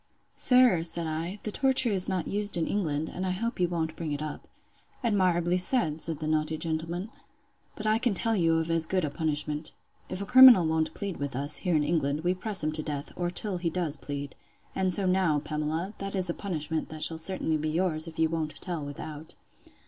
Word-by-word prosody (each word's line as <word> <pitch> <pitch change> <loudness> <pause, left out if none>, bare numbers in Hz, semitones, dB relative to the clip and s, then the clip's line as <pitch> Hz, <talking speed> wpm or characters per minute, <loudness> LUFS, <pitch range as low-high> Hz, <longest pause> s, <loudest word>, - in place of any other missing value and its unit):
Sir, 250 -9 +4
said 165 0 -1
I, 165 +5 -4
the 215 - -3
torture 260 -1 +2
is 190 -1 +4
not 185 -3 -2
used 205 -2 0
in 165 - 0
England, 160 -6 -1
and 185 - -6
I 190 - -1
hope 230 +6 -3
you 180 - +2
won't 160 -2 -3
bring 160 -3 -5
it 145 - -3
up. 155 - -7 0.6
Admirably 180 -5 +1
said! 180 - +4
said 165 -2 +1
the 155 - -5
naughty 155 0 0
gentleman.—But 175 - -7
I 215 +1 +2
can 235 -4 0
tell 225 +4 0
you 165 -4 +2
of 160 0 -1
as 165 -1 +2
good 185 -2 0
a 145 - -4
punishment. 150 -1 -3 0.4
If 185 - -3
a 200 - -3
criminal 250 -5 +8
won't 160 0 -1
plead 200 -3 -4
with 140 -2 -4
us, 140 +2 -1
here 180 -4 -1
in 150 - +2
England, 150 -2 0
we 180 +1 +2
press 190 -1 +2
him 155 - 0
to 155 0 +1
death, 145 -2 -5
or 175 -1 -2
till 185 +1 0
he 175 -1 -1
does 165 -3 -2
plead. 140 -1 -6 0.4
And 190 -1 0
so 195 +2 0
now, 185 -4 +2
Pamela, 155 +5 -3
that 195 0 -4
is 185 -2 +1
a - - -4
punishment 160 -6 -4
shall 160 -1 +2
certainly 160 -2 -1
be 155 +1 -2
yours, 165 -1 0
if 160 - -10
you 160 - +3
won't 160 -1 -3
tell 175 -5 -5
without. 150 +2 -8
170 Hz, 210 wpm, -28 LUFS, 155-190 Hz, 0.6 s, criminal